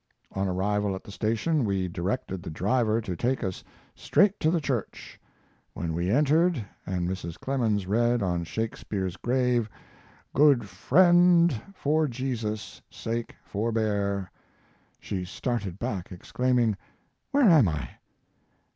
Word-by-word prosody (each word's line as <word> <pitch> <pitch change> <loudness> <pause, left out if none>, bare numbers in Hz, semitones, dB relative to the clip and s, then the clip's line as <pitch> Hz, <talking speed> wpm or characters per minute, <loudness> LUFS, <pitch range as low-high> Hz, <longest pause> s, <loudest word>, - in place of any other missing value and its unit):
On 95 0 -1
arrival 100 +2 0
at 95 - -8
the - - -11
station 115 +9 0
we 95 -3 0
directed 95 +2 -3
the - - -7
driver 110 +6 +1
to 95 -5 -4
take 125 +7 -1
us 95 -2 -4 0.3
straight 200 0 +2
to 155 - +2
the 170 +1 +2
church. 135 -7 -4 0.5
When 80 -1 -3
we 85 +2 -1
entered, 150 - +3 0.2
and 90 -2 -1
Mrs. 90 -2 -5
Clemens 115 -7 0
read 120 +3 +2
on 90 -2 0
Shakespeare's 95 -1 -3
grave, 125 -1 +1 0.6
'Good 135 -6 +4
friend, 175 - +5 0.2
for 155 0 +1
Jesus' 115 -5 -4
sake, 115 +1 -4
forbear,' 100 -3 -1 0.7
she 95 -2 -4
started 100 -1 -3
back, 105 -6 -4
exclaiming, 120 +3 0 0.5
'where 275 -3 +4
am 155 - +6
I?' 75 -7 -3
110 Hz, 125 wpm, -27 LUFS, 95-130 Hz, 0.7 s, am